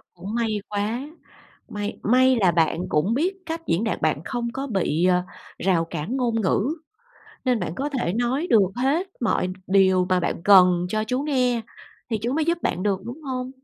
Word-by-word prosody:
Cũng 190 +5 -6
may 220 -3 -1
quá, 210 +4 -1 0.7
may 205 0 -5
may 255 +3 +4
là 190 -5 +4
bạn 165 +1 +1
cũng 180 +9 +1
biết 360 +8 0
cách 330 0 -5
diễn 175 +7 +1
đạt, 225 - -2
bạn 155 -2 +1
không 240 -2 -3
có 270 +2 -4
bị, 185 - 0
ờ, 180 -1 +3 0.4
rào 180 -3 +1
cản 165 - -4
ngôn 235 -3 0
ngữ, 200 +3 +1 0.8
nên 250 -4 +1
bạn 160 - -3
có 275 +6 -2
thể 250 -11 -2
nói 245 - 0
được 225 -4 +6 0.2
hết 280 +9 +1
mọi 215 -6 +1 0.2
điều 190 -1 +4
mà 185 -1 +2
bạn 170 - -2
cần 180 -3 +6
cho 215 +3 -1
chú 250 +4 -1
nghe, 250 -5 +1 0.5
thì 220 - 0
chú 240 +2 -1
mới 310 +2 +1
giúp 340 +2 +1
bạn 180 - -1
được, 195 -2 0
đúng 245 +7 -8
hông? 255 -2 -4
220 Hz, 195 wpm, -23 LUFS, 185-255 Hz, 0.8 s, được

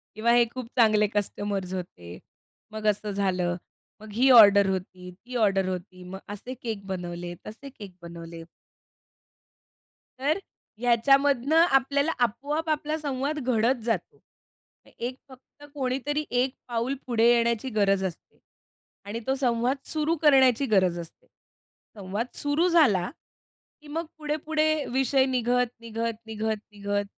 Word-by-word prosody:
किंवा 230 +2 +2
हे 240 -1 +5
खूप 255 -3 -6
चांगले 215 -2 +4
कस्टमर्स 200 -2 -2
होते. 90 - -7 0.5
मग 215 0 -4
असं 210 0 0
झालं, 185 -3 0 0.5
मग 215 - -11
ही 255 +4 +3
ऑर्डर 200 -4 +8
होती, 185 -1 -5
ती 245 +7 -12
ऑर्डर 195 -4 +2
होती, 185 0 -6
मग 190 +2 -8
असे 210 +5 -7
केक 220 -4 -5
बनवले, 175 -1 -5
तसे 230 +6 -9
केक 205 -8 -11
बनवले." 170 -1 -9 1.8
तर 295 +6 +1 0.4
ह्याच्यामधनं 275 +4 +3 0.2
आपल्याला 280 +4 0
आपोआप 295 +8 -2
आपला 305 0 -1
संवाद 285 0 -2
घडत 245 -1 +1
जातो. 220 -7 -2 0.7
अ, - - -19
एक 250 +2 -4
फक्त 265 +3 -18
कोणीतरी 280 +2 -2
एक 260 +1 0
पाऊल 240 +3 -1
पुढे 230 -1 +3
येण्याची 235 +1 +1
गरज 195 -1 +3
असते 175 -3 -8 0.7
आणि 215 +3 -4
तो 265 - +2
संवाद 245 +2 +1
सुरू 315 +1 0
करण्याची 270 -3 +5
गरज 180 -3 +3
असते. 165 -1 -12 0.7
संवाद 200 +5 -3
सुरू 295 +5 +1
झाला, 230 - +4 0.7
की 300 - -15
मग 325 +3 -3
पुढे-पुढे 310 0 0
विषय 265 +1 +2
निघत, 250 -1 +1
निघत, 230 0 -3
निघत, 220 0 -2
निघत 205 0 -2
230 Hz, 130 wpm, -26 LUFS, 200-270 Hz, 1.8 s, ऑर्डर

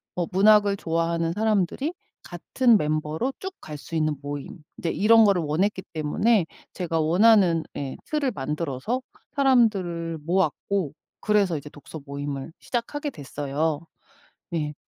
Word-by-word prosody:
뭐 175 -2 -1
문학을 205 +1 +5
좋아하는 165 0 0
사람들이 220 - 0 0.3
같은 225 +6 +2
멤버로 155 - -1
쭉 380 0 -6
갈 150 -1 -7
수 165 - -8
있는 155 -1 +1
모임 145 +3 -7
이제 165 - -2
이런 225 +4 +5
거를 195 -4 +3
원했기 190 +6 0
때문에 165 +6 +2 0.3
제가 165 -3 -2
원하는 175 0 +4
예 135 -2 -4
틀을 290 -4 0
만들어서 150 - -3 0.3
사람들을 195 - +2
모았고 185 -1 0 0.3
그래서 200 -6 +2
이제 145 +1 -8
독서 150 +2 -10
모임을 140 +1 -5
시작하게 290 +5 -3
됐어요. 145 +2 -2 0.7
네. 150 -3 -2
170 Hz, 295 characters per minute, -25 LUFS, 150-210 Hz, 0.7 s, 문학을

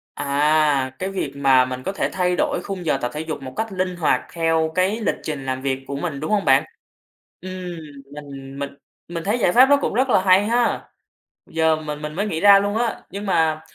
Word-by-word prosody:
À, 145 -1 +2
cái 190 +1 -3
việc 185 -8 -3
mà 135 -2 +4
mình 130 0 -5
có 195 - -3
thể 200 - -1
thay 180 -1 +1
đổi - - 0
khung 185 -4 -5
giờ - - +2
tập 125 - -1
thể 150 - -4
dục 155 -3 -5
một 130 -1 -7
cách 220 -2 -3
linh 185 -1 -2
hoạt 170 -3 +2
theo 165 -1 +1
cái 190 +5 +1
lịch 220 - 0
trình 145 -4 -5
làm 130 0 -3
việc 135 -1 -2
của 140 - -4
mình, 140 -1 -4
đúng 155 - -4
hông 210 -2 +1
bạn? 135 +1 +4 0.8
Ừm, 185 - -8 0.6
mình 140 -2 -9
mình 140 0 -3 0.4
mình 170 -1 -5
thấy 210 +5 0
giải 180 - +2
pháp 255 +5 +7
nó 285 - +6
cũng - - -2
rất 260 +4 +2
là - - +4
hay 190 +1 +5
ha. 235 +2 0 0.6
Giờ 160 -1 +2
mình 150 -1 -6
mình 150 0 -5
mới 200 +6 -1
nghĩ 160 -6 -2
ra 200 +2 +7
luôn 205 +2 -1
á. 235 -1 -1
Nhưng 200 +2 -6
mà 160 -4 +1
160 Hz, 225 wpm, -22 LUFS, 140-195 Hz, 0.8 s, pháp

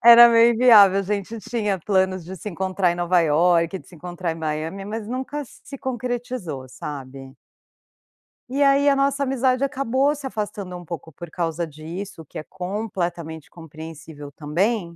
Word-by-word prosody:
Era 235 0 +11
meio 230 0 +6
inviável, 210 -5 +7
a - - +1
gente 205 +3 -3
tinha 210 -3 -1
planos 190 -1 +1
de 190 +2 -8
se 210 - -6
encontrar 185 -1 0
em - - -4
Nova 175 0 +2
Iorque, 170 +3 +3
de - - -18
se - - -15
encontrar 175 +1 -4
em - - -7
Miami, 160 +4 -4
mas 215 +1 -5
nunca 265 +4 -4
se 275 +1 -12
concretizou, 240 - -4
sabe? 135 0 -8 1.1
E 275 +2 -1
aí, 280 +1 +4
a 280 - +5
nossa 275 0 +1
amizade 260 0 +1
acabou 275 0 +1
se 280 -2 -6
afastando 205 -5 -5
um 175 - -11
pouco 160 -1 -7
por 165 +3 -10
causa 170 -1 -2
disso, 160 +4 -8
que - - -11
é - - -5
completamente 180 -5 -4
compreensível 160 -2 -10
também. 170 +5 -1
190 Hz, 165 wpm, -23 LUFS, 165-235 Hz, 1.1 s, Era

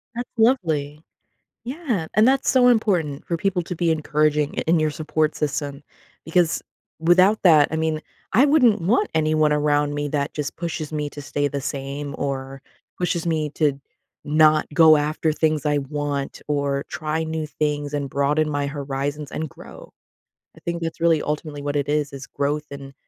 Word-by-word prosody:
That's 245 +1 -4
lovely. 160 - +1 0.6
Yeah. 250 - -2
And 215 +4 +5
that's 270 0 +2
so 250 -1 +5
important 180 - +1
for 170 - -1
people 180 0 0
to 180 - -5
be 170 0 +1
encouraging 150 -1 +1
i - - +1
in 165 +1 +3
your 155 -1 +1
support 155 0 -1
system 145 -1 -3 0.4
because 165 0 +1 0.4
without 185 +6 +4
that, 155 -5 +6
I 160 - -2
mean, 160 -1 -1 0.3
I 245 +7 +5
wouldn't 250 -9 +4
want 235 - +2
anyone 155 -1 +2
around 145 0 +1
me 145 0 -2
that 140 -1 -2
just 150 -2 -4
pushes 160 -2 -4
me 150 -1 -2
to 145 - -9
stay 145 +1 -1
the 140 -1 -4
same 140 +1 -5
or 135 -1 -4 0.4
pushes 175 -1 -1
me 155 -2 0
to 145 -3 +1 0.4
not 155 +1 +4
go 160 -2 +7
after 155 +2 0
things 155 -1 0
I 145 -1 +2
want 145 0 -4
or 140 -1 0
try 155 0 -2
new 160 -1 -3
things 150 -1 -2
and 140 -2 -2
broaden 150 +2 +1
my 145 -1 -1
horizons 140 0 -4
and 160 -1 -4
grow. - - -13 0.6
I - - -15
think 170 0 -3
that's 165 0 -4
really 165 -2 +3
ultimately 150 -1 -4
what 145 0 -2
it 145 -1 -1
is, 145 -1 0
is 135 -1 -8
growth, 145 +2 -2
and 140 -1 -9
150 Hz, 175 wpm, -22 LUFS, 145-165 Hz, 0.6 s, go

